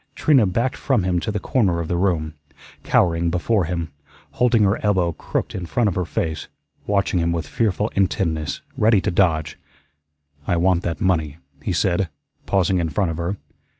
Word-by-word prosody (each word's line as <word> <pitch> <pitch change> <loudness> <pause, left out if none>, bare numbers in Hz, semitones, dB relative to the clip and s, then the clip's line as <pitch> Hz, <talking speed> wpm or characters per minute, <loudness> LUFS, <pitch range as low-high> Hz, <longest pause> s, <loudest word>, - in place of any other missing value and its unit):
Trina 135 -9 +4
backed 115 +8 -1
from 130 -8 +1
him 90 -1 +1
to 110 +5 -3
the 105 - -2
corner 95 -7 +1
of 85 - -3
the 90 - -1
room, 85 -4 0 0.5
cowering 85 -1 +2
before 90 +3 +1
him, 85 -2 -3 0.4
holding 120 -3 +3
her 100 +2 +1
elbow 95 -5 +2
crooked - - -4
in 90 -2 -5
front 120 +5 +1
of 100 - 0
her 90 -1 -1
face, 80 -1 -3 0.4
watching 100 -2 +1
him 85 0 +1
with 85 -3 -2
fearful 105 +4 0
intentness, 85 -6 -1
ready 110 -1 +4
to 100 +2 -1
dodge. 80 -4 +1 0.9
"I 90 - +1
want 90 0 +2
that 85 -4 -4
money," 80 -5 0 0.2
he 95 - -2
said, 90 +2 +1 0.4
pausing 95 -1 +2
in 85 -2 -1
front 85 +3 0
of 80 - -5
her. 85 +4 -2
90 Hz, 180 wpm, -22 LUFS, 85-100 Hz, 0.9 s, Trina